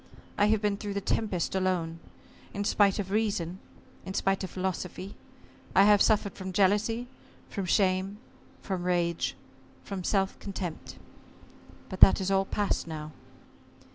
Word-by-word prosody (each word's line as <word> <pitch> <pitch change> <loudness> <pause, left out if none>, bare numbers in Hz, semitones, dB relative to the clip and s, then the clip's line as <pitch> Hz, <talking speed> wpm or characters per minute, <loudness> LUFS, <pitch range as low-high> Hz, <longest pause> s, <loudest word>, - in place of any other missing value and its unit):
I 205 - +3
have 215 0 +2
been 205 -1 +1
through 205 -1 -5
the - - +1
tempest 195 -3 -1
alone. 180 -3 -1 0.6
In 205 - -1
spite 200 -1 +3
of 195 -2 -4
reason, 195 -5 -1 0.4
in 190 +1 -6
spite 195 0 +1
of 190 - -4
philosophy 185 +1 -4 0.6
I 195 - +7
have 205 0 +6
suffered 205 -2 +3
from 190 -1 -7
jealousy, 210 +5 +2 0.4
from 195 - -3
shame, 190 +1 +1 0.5
from 185 -3 -3
rage, 175 -2 0 0.5
from 195 -2 -5
self 195 +1 0
contempt. 185 -4 -6 0.9
But 185 - -7
that - - +8
is 190 0 -1
all 195 0 +3
past 205 -3 -1
now." 155 -1 -6
195 Hz, 140 wpm, -29 LUFS, 185-205 Hz, 0.9 s, that